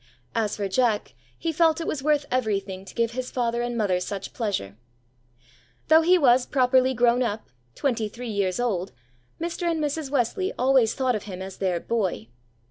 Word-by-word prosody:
As 220 -2 0
for 200 -1 -1
Jack, 220 +1 +1 0.2
he 330 - -2
felt 320 0 +3
it 330 - -3
was 300 - -2
worth 295 0 +2
everything 200 -6 -1
to - - -12
give 230 -1 +1
his 255 +1 -4
father 235 -1 -1
and 240 0 -2
mother 195 -5 +1
such 195 +1 -5
pleasure. 195 - -3 1.1
Though 320 +1 +7
he 360 +3 +5
was 250 -5 +4
properly 260 -1 +3
grown 240 +1 +3
up, 220 -3 -2 0.3
twenty 235 -6 -1
three 240 +3 -7
years 200 -1 0
old, 195 - -1 0.5
Mr. 340 +1 -2
and 330 -1 0
Mrs. 295 -1 -2
Wesley 285 - 0
always 255 -3 +3
thought 260 -2 +1
of 210 - -5
him 185 -3 -7
as 190 0 -7
their 185 -3 0
"boy." 185 - -2
240 Hz, 180 wpm, -25 LUFS, 205-270 Hz, 1.1 s, Though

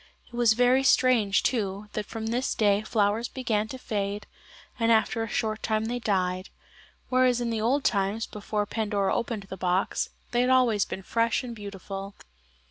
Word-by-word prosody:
It - - -25
was 240 -2 +4
very 250 +3 +4
strange, 250 -6 +3
too, 205 -4 -1
that 210 -1 -3
from 225 -1 -5
this 240 +4 -1
day 205 -2 +3
flowers 215 +1 +1
began 220 -5 -1
to 260 - -7
fade, 205 -4 -3 0.5
and 230 0 +3
after 225 0 +2
a 225 - -2
short 215 -1 -1
time 220 0 0
they 245 +2 -2
died, 185 -4 -1 0.6
whereas 255 -1 +3
in 240 -1 -1
the 225 -1 -1
old 265 +5 +1
times, 205 0 0
before 210 0 -3
Pandora 205 -2 -1
opened 230 -3 -2
the 190 0 -8
box, 185 +1 0 0.2
they 240 - +1
had 250 - +3
been 260 - +5
always 230 -6 +3
fresh 230 +5 -1
and 240 -2 -6
beautiful. 200 -1 -7
220 Hz, 175 wpm, -27 LUFS, 200-240 Hz, 0.6 s, been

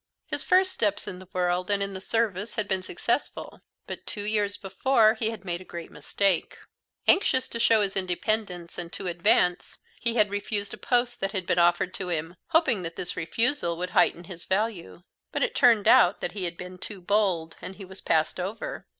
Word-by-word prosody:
His - - -2
first 370 +1 +4
steps 205 - -1
in 180 - -6
the 185 - -13
world 180 0 0
and 200 -1 +1
in 195 0 -4
the 190 - -6
service 215 -1 -1
had 215 -3 -2
been 190 -1 0
successful, 235 +8 -3 0.2
but - - -8
two 205 - -5
years 205 -1 0
before 215 +3 +3
he 220 -1 -1
had 225 -3 -8
made 175 -1 -3
a - - -9
great 170 -2 -8
mistake. 195 -4 0 0.5
Anxious 260 -9 +3
to 230 - -5
show 225 -1 +4
his 195 0 -2
independence 185 -1 -2
and 170 -1 -6
to 195 - -7
advance, 175 0 +1 0.2
he 235 -1 -1
had 210 -3 +3
refused 205 0 -3
a - - -7
post 245 -1 0
that 195 0 -2
had 185 -2 -2
been 175 - +1
offered 175 +1 +3
him, 175 -2 -3
hoping 320 - +2
that 165 -1 -6
this 180 - -4
refusal 170 - 0
would 180 +1 -3
heighten 175 - +3
his 175 -1 -9
value; 190 -3 -2 0.3
but - - 0
it - - 0
turned 235 -6 +4
out 180 - +6
that - - -3
he 195 -3 -3
had 170 -1 -3
been 180 0 -9
too 205 0 -6
bold, 180 -4 +1
and 190 - -7
he 195 - -9
was 190 +1 -12
passed 160 +3 +1
over. 220 - -5
195 Hz, 200 wpm, -27 LUFS, 180-220 Hz, 0.5 s, out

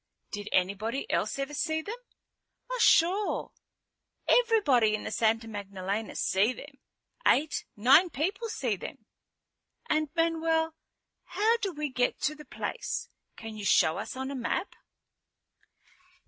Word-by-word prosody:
"Did 205 0 -5
anybody 205 +8 0
else - - 0
ever 275 +1 -3
see 315 +2 -1
them?" 415 - -5 0.8
"Oh, - - -2
sure. 380 +4 +3 0.8
Everybody 295 - +4
in 215 - -5
the - - -4
Santa 225 0 +1
Magdalena 200 0 -4
see 205 +6 +2
them. - - -12 0.5
Eight, 300 +1 +2
nine 270 - +6
people 375 - -2
see 245 - -1
them." - - -9 0.8
"And 310 -1 +1
Manuel, 325 -1 +1 0.5
how 450 +3 +2
do 405 -5 -2
we 300 -2 -3
get 250 -1 0
to 300 - +1
the 300 0 -12
place? 470 - -4 0.3
Can 225 -1 -8
you 210 - -7
show 160 -4 +4
us - - -5
on 265 +1 -4
a - - -4
map?" 260 - -2
275 Hz, 135 wpm, -29 LUFS, 220-330 Hz, 0.8 s, nine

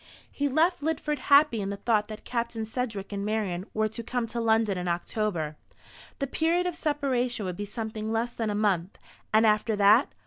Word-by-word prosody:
He 285 0 -1
left 320 +4 +2
Lidford 300 -1 -1
happy 280 -6 +5
in 195 - -3
the 200 - -4
thought 210 0 +1
that 215 -1 -8
Captain 235 -2 -2
Sedgewick 220 -4 -4
and 200 0 -3
Marian 205 -3 -2
were 215 0 +1
to 220 +2 -6
come 240 +1 -2
to 235 - -3
London 220 -3 +2
in 180 0 -3
October. 170 -3 -2 0.6
The 275 - -1
period 330 +6 +1
of 355 -2 -2
separation 265 - -1
would 180 -1 -3
be 205 - -4
something 220 +1 -4
less 230 +2 -1
than 225 -3 -2
a 205 - -1
month. 195 -4 0 0.3
And 220 +1 +5
after 215 +1 +2
that? 205 +6 +5
220 Hz, 195 wpm, -27 LUFS, 205-250 Hz, 0.6 s, happy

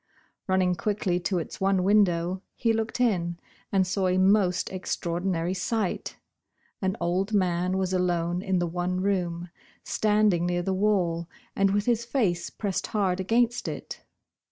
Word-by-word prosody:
Running 185 -1 +2
quickly 190 -2 -1
to 180 +1 -1
its 165 - -5
one 190 -1 +2
window, 185 -3 +2
he 230 -2 +1
looked 225 +2 -2
in, 175 -8 +1 0.3
and 190 -1 +3
saw 185 +1 0
a 185 0 +2
most 190 -1 +3
extraordinary 175 -1 -2
sight 195 +1 -2 0.7
An 190 -1 -1
old 190 +5 0
man 185 -1 +1
was 190 -1 -1
alone 175 -1 0
in 190 -1 0
the 175 - +1
one 180 +2 -2
room, 175 -3 -1 0.3
standing 210 -5 +2
near 175 0 0
the 190 - 0
wall 180 -4 +1 0.3
and 195 0 +3
with 205 +1 +1
his 235 -1 +1
face 220 -9 0
pressed 200 -4 -3
hard 190 -4 0
against 235 +5 +1
it. - - -6
185 Hz, 150 wpm, -27 LUFS, 175-205 Hz, 0.7 s, and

